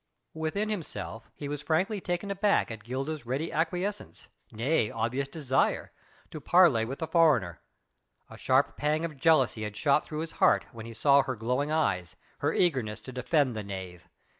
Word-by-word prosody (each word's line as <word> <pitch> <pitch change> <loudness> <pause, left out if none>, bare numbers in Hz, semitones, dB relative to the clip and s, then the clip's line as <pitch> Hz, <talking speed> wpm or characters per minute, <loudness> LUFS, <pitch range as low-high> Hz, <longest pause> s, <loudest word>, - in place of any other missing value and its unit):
Within 160 +7 -2
himself 115 - -5
he 145 - -6
was 145 0 -4
frankly 185 +7 0
taken 175 +3 -3
aback 200 - +2
at 110 -2 -8
Gilda's 135 +3 -4
ready 140 +6 -2
acquiescence 180 +5 -3 0.2
nay 115 0 +1
obvious 120 +5 -2
desire 135 -4 0 0.4
to 155 - -7
parley 155 -9 +5
with 135 +4 -5
the 160 - -3
foreigner. 150 - +2 0.7
A - - -12
sharp 130 +2 +2
pang 155 +2 0
of 160 -3 -6
jealousy 135 -6 +3
had 105 -1 -5
shot 140 +5 +3
through 155 0 -5
his 165 0 -5
heart 190 - +4
when 115 -2 -9
he 115 - -8
saw 140 +2 +5
her 130 -1 -3
glowing 125 +7 -1
eyes, 95 - 0 0.2
her - - +1
eagerness 130 -11 0
to 130 - -9
defend 130 0 +1
the 110 - -3
knave. 95 -3 -8
140 Hz, 170 wpm, -29 LUFS, 115-160 Hz, 0.7 s, parley